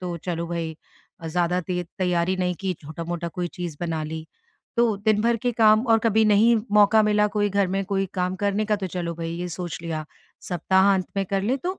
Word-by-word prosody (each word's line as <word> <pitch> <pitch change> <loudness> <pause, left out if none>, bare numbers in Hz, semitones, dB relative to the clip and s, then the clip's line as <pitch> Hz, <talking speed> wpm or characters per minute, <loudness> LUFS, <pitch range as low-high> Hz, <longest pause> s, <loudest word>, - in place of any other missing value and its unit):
तो 180 -2 -4
चलो 170 0 -4
भई 165 -2 -4 0.5
अ, 165 - -5
ज़्यादा 175 +2 +1
ते 180 -1 -1 0.2
तैयारी 180 0 +1
नहीं 180 -1 0
की 190 -1 -1
छोटा-मोटा 170 +3 -5
कोई 175 +1 -4
चीज़ 175 -4 -5
बना 165 -2 -2
ली। 160 0 -6 0.5
तो 235 - +5
दिन 210 +1 +1
भर 235 +1 +2
के 245 - +1
काम 220 0 +5
और 225 - +4
कभी 220 0 +4
नहीं 215 +3 +5 0.2
मौका 210 +1 +6
मिला 210 0 +3
कोई 205 0 +2
घर 200 0 +2
में 195 0 0
कोई 195 0 +1
काम 180 +1 0
करने 205 +1 +1
का 210 0 +1
तो 195 - -4
चलो 170 -2 -3
भई 165 0 -5
ये 180 +1 -4
सोच 175 -3 -5
लिया 160 -2 -4 0.4
सप्ताह-अंत 190 +2 +2
में 195 - +1
कर 195 -1 +1
लें, 250 +6 +1
तो 370 +5 -4
185 Hz, 215 wpm, -24 LUFS, 170-210 Hz, 0.5 s, मौका